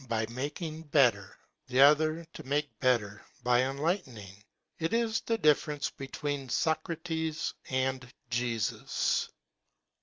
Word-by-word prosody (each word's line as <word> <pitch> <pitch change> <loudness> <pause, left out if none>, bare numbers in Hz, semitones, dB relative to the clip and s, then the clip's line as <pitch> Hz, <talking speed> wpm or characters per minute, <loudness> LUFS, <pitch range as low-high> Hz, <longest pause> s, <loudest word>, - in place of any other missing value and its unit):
by 110 -1 +1
making 155 +5 -4
better, 125 - +2 0.3
the 125 0 0
other 155 +3 +5
to - - -8
make 145 +2 -2
better 105 -6 +1 0.2
by 120 0 +4
enlightening. 130 - -3 0.4
It 165 +5 -1
is 225 -1 +1
the 230 - 0
difference 150 -4 +2
between 140 0 -4
Socrates 160 +2 -1 0.2
and 130 -1 -1 0.2
Jesus. 120 -3 0
140 Hz, 110 wpm, -30 LUFS, 125-160 Hz, 0.4 s, other